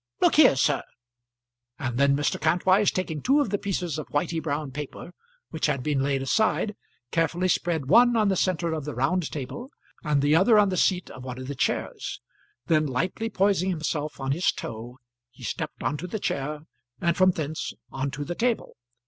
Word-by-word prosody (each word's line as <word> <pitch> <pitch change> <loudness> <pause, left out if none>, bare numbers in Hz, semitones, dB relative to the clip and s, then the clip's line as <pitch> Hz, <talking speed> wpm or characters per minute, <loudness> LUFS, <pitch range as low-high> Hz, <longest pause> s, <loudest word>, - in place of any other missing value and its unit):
Look - - +4
here, - - +7
sir." - - +2 1.0
And 125 -2 -3
then 140 0 +4
Mr. 145 - -1
Kantwise, 185 +5 +3
taking 160 -5 -3
two 275 +3 +3
of 280 -9 0
the 205 - 0
pieces 175 -6 -2
of 155 - -6
whitey 160 +2 -1
brown 145 -2 -3
paper 150 +5 -7 0.4
which 160 - 0
had 130 - -1
been 145 -3 0
laid 135 -1 0
aside, 215 +6 +1 0.4
carefully 170 +2 +1
spread 170 -4 0
one 240 - +5
on 215 -2 +3
the 195 - +2
centre 170 -2 0
of 155 -2 -3
the 150 +1 -5
round 155 +6 0
table, 155 - -6 0.3
and 150 -3 +1
the 145 +2 +4
other 205 +6 +5
on 205 -1 +5
the 185 - -1
seat 180 0 +1
of 130 - -10
one 125 -1 -6
of 130 0 -7
the 140 - -3
chairs. - - -2 0.5
Then 155 -2 +2
lightly 180 - -2
poising 190 -3 +2
himself 155 -3 -3
on 135 0 -2
his 170 +6 +2
toe, 115 +3 -7 0.3
he - - -16
stepped - - -4
on 145 - 0
to 175 +5 -6
the 200 - -3
chair, 150 -3 -2 0.4
and 170 -1 +1
from 185 0 +5
thence 155 -3 -3 0.2
on 135 +1 -2
to 145 +1 -5
the 175 - -3
table. 235 +5 -1
160 Hz, 195 wpm, -26 LUFS, 140-185 Hz, 1.0 s, here